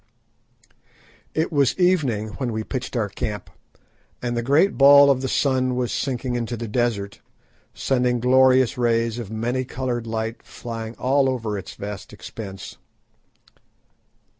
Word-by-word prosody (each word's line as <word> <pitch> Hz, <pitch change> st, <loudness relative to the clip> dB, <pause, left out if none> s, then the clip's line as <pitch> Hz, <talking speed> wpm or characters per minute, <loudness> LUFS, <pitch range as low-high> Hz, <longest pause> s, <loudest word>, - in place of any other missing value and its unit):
It 160 Hz, +2 st, 0 dB
was 140 Hz, -5 st, +2 dB
evening 145 Hz, -, +1 dB
when 125 Hz, -3 st, -1 dB
we 110 Hz, 0 st, -3 dB
pitched 130 Hz, +2 st, -5 dB
our 110 Hz, -4 st, 0 dB
camp, 105 Hz, +1 st, -5 dB, 0.7 s
and 120 Hz, -1 st, -3 dB
the 120 Hz, -, 0 dB
great 145 Hz, +11 st, +3 dB
ball 140 Hz, 0 st, +8 dB
of 130 Hz, -1 st, 0 dB
the 135 Hz, -, -2 dB
sun 130 Hz, -1 st, +1 dB
was 125 Hz, -1 st, -1 dB
sinking 130 Hz, -2 st, -2 dB
into 120 Hz, 0 st, -3 dB
the 115 Hz, +1 st, -5 dB
desert, 105 Hz, -3 st, -2 dB, 0.5 s
sending 125 Hz, -2 st, +1 dB
glorious 130 Hz, 0 st, +4 dB
rays 115 Hz, -1 st, +1 dB
of 115 Hz, -5 st, -6 dB
many 120 Hz, +4 st, -2 dB
coloured 125 Hz, -2 st, -3 dB
light 115 Hz, +1 st, -3 dB
flying 115 Hz, -1 st, -7 dB
all 135 Hz, +1 st, +2 dB
over 115 Hz, -5 st, -2 dB
its 95 Hz, -2 st, -7 dB
vast 100 Hz, -1 st, -7 dB
expanse. 100 Hz, -4 st, -9 dB
120 Hz, 140 wpm, -23 LUFS, 115-130 Hz, 0.7 s, ball